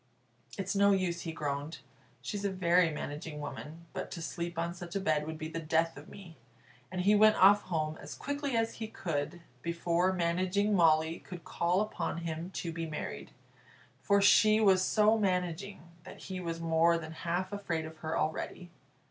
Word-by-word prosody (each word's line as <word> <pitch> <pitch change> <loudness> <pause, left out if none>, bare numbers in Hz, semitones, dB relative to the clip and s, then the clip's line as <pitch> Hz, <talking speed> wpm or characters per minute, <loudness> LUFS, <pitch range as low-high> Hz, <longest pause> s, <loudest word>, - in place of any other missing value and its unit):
"It's 195 0 -2
no 200 0 +5
use," 180 -3 0
he 165 - -4
groaned, 145 0 -4 0.5
"she's 205 -2 -4
a 200 - +1
very 180 -2 +3
managing 150 0 -5
woman, 155 +3 -7
but - - -4
to - - -6
sleep 170 0 -4
on 170 +1 -1
such 175 0 -9
a - - +1
bed 155 -5 0
would 160 0 -5
be 155 0 -5
the 165 +1 -5
death 165 +1 +1
of 145 +2 -12
me." 175 -5 -12 0.5
And 185 -1 -2
he 200 +3 +4
went 215 +1 +6
off 200 +2 +6
home 155 -3 -2
as - - -8
quickly 285 -3 -2
as 225 0 -1
he 220 - -2
could, 170 -5 -3 0.2
before 170 +2 +1
Managing 185 +4 +1
Molly 160 -2 +3
could 175 -3 -10
call 175 +3 +1
upon 215 -5 -3
him 165 +2 -4
to 170 -3 -4
be 165 0 -4
married; 155 -1 -6 0.7
for 200 +9 +3
she 215 +1 +6
was 195 -4 +5
so 215 +3 +3
managing 185 0 -1 0.2
that - - -11
he 185 -1 -5
was 170 -2 -4
more 165 +1 +3
than 160 -1 -7
half 175 +4 -3
afraid 170 -6 -2
of 160 0 -10
her 160 +1 -3
already. 170 +3 -3
170 Hz, 180 wpm, -31 LUFS, 160-195 Hz, 0.7 s, went